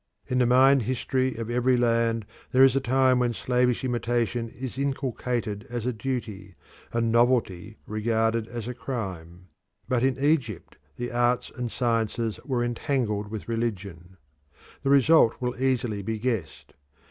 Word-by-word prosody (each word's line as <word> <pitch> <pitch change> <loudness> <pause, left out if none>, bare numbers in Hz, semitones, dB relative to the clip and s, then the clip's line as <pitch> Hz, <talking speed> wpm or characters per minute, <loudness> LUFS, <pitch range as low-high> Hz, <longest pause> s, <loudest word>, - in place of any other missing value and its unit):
In 125 - -1
the 125 - +3
mind 130 +2 +5
history 130 +1 -1
of 115 +1 -5
every 125 +1 +2
land 115 -2 +1 0.3
there 130 +1 +6
is 135 -1 +5
a - - +4
time 130 0 +3
when 120 -2 0
slavish 125 +1 +1
imitation 120 -1 -1
is 130 +2 -7
inculcated 125 -5 -2
as 120 -1 -4
a 125 - 0
duty, 110 -6 -5 0.4
and 115 -1 0
novelty 115 -4 +1
regarded 110 +1 0
as 120 -1 -6
a 125 - -3
crime. 95 -8 -6 0.4
But 125 -2 +1
in 135 -1 +2
Egypt 135 - -1 0.2
the 120 0 -4
arts 120 +1 +1
and 120 -2 -4
sciences 115 -2 -1
were 125 -4 -1
entangled 120 -4 -1
with 110 -1 -6
religion. 100 -6 -4 0.6
The 135 - -1
result 140 -2 +5
will 125 0 -2
easily 125 -6 0
be 110 +3 -3
guessed. 110 -8 -3
120 Hz, 145 wpm, -26 LUFS, 110-125 Hz, 0.6 s, there